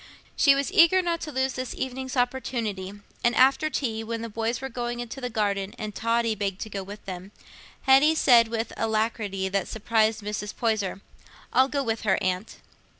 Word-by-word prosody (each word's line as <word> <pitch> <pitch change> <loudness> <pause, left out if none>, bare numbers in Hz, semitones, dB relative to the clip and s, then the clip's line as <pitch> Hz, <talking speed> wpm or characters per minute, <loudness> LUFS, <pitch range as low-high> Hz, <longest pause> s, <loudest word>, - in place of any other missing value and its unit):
She 280 -2 +5
was 280 0 -1
eager 365 +3 +6
not 340 -1 -1
to 305 - -5
lose 265 -1 0
this 255 -1 -5
evening's 260 0 -4
opportunity; 235 -6 -1 0.3
and 240 0 +3
after 275 +4 +4
tea, 225 -6 -2
when 230 0 -4
the 230 - -5
boys 225 +2 -2
were 270 - -4
going 240 -1 -4
into 240 +3 -6
the 250 - -3
garden 200 -3 -1
and 215 -2 -5
Totty 230 +1 +1
begged 200 -2 -3
to 220 - -5
go 200 - -3
with 200 +2 -10
them, 185 +1 -7 0.5
Hetty 275 +4 +5
said, 240 -6 +6
with 225 0 -3
an - - -8
alacrity 215 -3 -1
that 195 -1 -1
surprised 220 0 +1
Mrs. 210 0 -4
Poyser, 210 -5 -1 0.5
"I'll 260 +1 +4
go 280 0 -1
with 225 -2 -2
her, 195 -3 +2
Aunt." 185 +2 -2
230 Hz, 190 wpm, -26 LUFS, 210-260 Hz, 0.5 s, eager